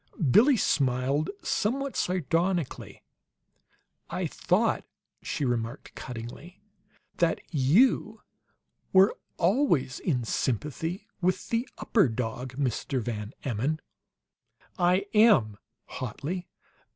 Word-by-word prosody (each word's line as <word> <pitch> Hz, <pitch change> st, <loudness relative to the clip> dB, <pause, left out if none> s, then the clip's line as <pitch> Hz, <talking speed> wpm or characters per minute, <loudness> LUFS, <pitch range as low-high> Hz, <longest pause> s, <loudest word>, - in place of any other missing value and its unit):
Billie 250 Hz, -, +6 dB
smiled 135 Hz, -, +1 dB
somewhat 275 Hz, +5 st, -1 dB
sardonically. 175 Hz, -1 st, -1 dB, 1.1 s
"I -, -, -2 dB
thought," -, -, +1 dB, 0.4 s
she 145 Hz, -, -2 dB
remarked, 115 Hz, -2 st, -3 dB
cuttingly, 125 Hz, +8 st, -8 dB, 0.6 s
"that 170 Hz, -1 st, +2 dB
you 210 Hz, -, +3 dB, 0.7 s
were 190 Hz, +1 st, +6 dB, 0.2 s
always 170 Hz, -, +2 dB
in 130 Hz, -9 st, 0 dB
sympathy 150 Hz, -, -2 dB, 0.2 s
with 180 Hz, +1 st, 0 dB
the 235 Hz, +2 st, -1 dB
upper 200 Hz, -, +3 dB
dog, 125 Hz, +2 st, -4 dB
Mr. 130 Hz, 0 st, -1 dB
Van 110 Hz, -1 st, -4 dB
Emmon!" 135 Hz, +6 st, -1 dB, 1.0 s
"I 180 Hz, +2 st, +3 dB
am!" 205 Hz, -, +5 dB, 0.3 s
hotly. 155 Hz, -, -5 dB
155 Hz, 90 wpm, -28 LUFS, 125-190 Hz, 1.1 s, Billie